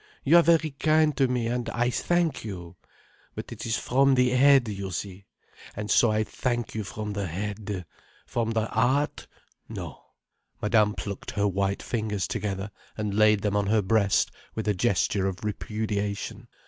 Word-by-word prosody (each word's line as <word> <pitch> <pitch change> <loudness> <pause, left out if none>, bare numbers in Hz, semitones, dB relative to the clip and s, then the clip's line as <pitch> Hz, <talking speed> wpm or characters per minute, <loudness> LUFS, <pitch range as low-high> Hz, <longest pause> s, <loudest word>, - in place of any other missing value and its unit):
You 160 +5 +6
are - - +8
very 160 -2 +3
kind 155 +1 +2
to 135 -2 +3
me, 125 -2 -1
and 120 +1 -2
I 120 +1 0
thank 175 +1 0
you. 90 -5 -7 0.6
But - - -7
it - - -6
is 115 - +1
from 135 +2 +3
the 125 -1 +3
head, 135 -1 +5
you 100 -2 -4
see. 95 +2 -6 0.5
And 105 0 -4
so 120 - +5
I 110 0 +1
thank 120 +2 -2
you 110 - -3
from 105 +1 -5
the 100 -2 -2
head. 100 +1 -4 0.4
From 115 -1 -1
the 110 -1 0
heart—no." 130 +7 -3 0.6
Madame 105 -1 +2
plucked 100 -2 -6
her 105 -1 0
white 100 0 -1
fingers 105 -4 -2
together 100 0 -3 0.3
and 105 -2 -2
laid 105 -1 +4
them 105 -1 0
on 100 -1 +1
her 105 0 +2
breast 100 0 +2 0.2
with 110 -1 -3
a 105 - +3
gesture 100 -1 +1
of 95 +1 -5
repudiation. 105 -1 -3
110 Hz, 165 wpm, -26 LUFS, 100-125 Hz, 0.6 s, are